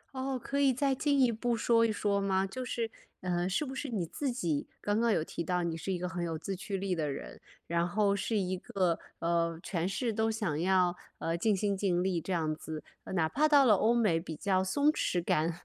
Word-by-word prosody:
哦， 260 0 -2
可 280 +4 -2
以 275 -2 +5
再 270 +2 +1
进 280 +1 +1
一 255 -3 +5
步 235 +1 -1
说 230 0 +3
一 230 - +3
说 205 -1 0
吗？ 195 -1 +1
就 225 +7 -5
是 230 -2 -2 0.3
呃， 180 0 0
是 250 +11 0
不 265 - -6
是 275 +1 -4
你 205 -7 -1
自 270 - -3
己 170 - -1
刚 205 +2 0
刚 235 -1 +3
有 160 - +2
提 170 - -5
到 180 0 0
你 170 -1 -1
是 165 +4 -4
一 185 - 0
个 180 - -3
很 180 -1 -3
有 165 -2 -2
自 195 +5 -4
驱 195 +1 -4
力 190 0 -1
的 155 -4 -1
人， - - -8 0.2
然 170 +1 0
后 200 +2 +2
是 210 +2 -1
一 185 -1 0
个 180 -2 0 0.2
呃， 170 -1 0
全 175 -2 -1
是 230 +3 -1
都 220 +1 +1
想 210 -9 -1
要 185 -1 +3 0.2
呃， 165 +1 -1
尽 205 +3 +2
心 200 +1 0
尽 185 -3 +1
力 180 -3 0
这 190 - -5
样 160 -3 0
子， 155 0 -7 0.3
哪 160 -3 +3
怕 300 - +2
到 285 -2 +6
了 220 - +7
欧 220 +4 +3
美 210 -9 +3
比 165 -2 -6
较 190 +1 +1
松 285 +11 +3
弛 180 - -1
感 160 +1 +2
190 Hz, 255 characters per minute, -31 LUFS, 170-230 Hz, 0.3 s, 了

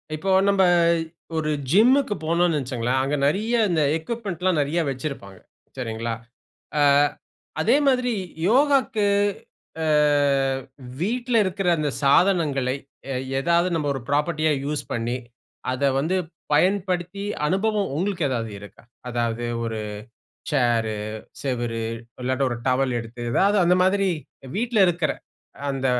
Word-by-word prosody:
இப்போ 190 +5 -2 0.2
நம்ப 195 -1 +4 0.7
ஒரு 155 -1 -1 0.2
ஜிம்க்கு 245 - +4
போனோனு 170 0 +2
வச்சிக்கோங்களேன், 130 -1 -1
அங்க 140 +2 0
நிறைய 210 +11 +1
இந்த 165 -3 +2 0.2
எக்விப்மென்ட்லாம் 185 -2 -2
நிறைய 145 +4 0
வச்சிருப்பாங்க. 130 -8 -6 0.4
சரிங்களா! 115 -2 -3 0.7
ஆ - - +4 0.8
அதே - - +4
மாதிரி 250 -2 +2 0.4
யோகாக்கு, 265 -4 +3 0.8
ஆ - - 0 1.2
வீட்ல 240 +5 -1
இருக்கிற 190 0 -2
அந்த 150 -1 0
சாதனங்களை 140 -4 +3 0.4
எ - - -2 0.2
எதாவது 170 +5 +2
நம்ம 150 -3 -1
ஒரு 135 - -5
ஃப்ராப்பர்ட்டியா 155 +2 +1
யூஸ் 150 0 -2
பண்ணி, 120 +2 -2 0.5
அத 130 +2 -3 0.2
வந்து 160 +6 0 0.4
பயன்படுத்தி 185 +2 +1 0.2
அனுபவம் 205 +2 0
உங்களுக்கு 180 0 -1
ஏதாவது 115 -4 -2
இருக்கா? 105 +2 -14 0.3
அதாவது 120 -1 -1 0.2
ஒரு 115 -1 -3 0.7
சேரு, 120 -6 +1 0.5
செவரு 120 -4 -2 0.4
இல்லாட்டா, 130 +2 0
ஒரு 120 - -2
டவல் 130 0 +2
எடுத்து, 115 +1 -8
எதாவது 200 - +3
அந்த 180 +1 +4
மாதிரி 195 +1 +2 0.5
வீட்ல 235 +1 0
இருக்கிற 170 -4 +1 0.6
அந்த 135 -1 -2
155 Hz, 115 wpm, -23 LUFS, 130-195 Hz, 1.2 s, நம்ப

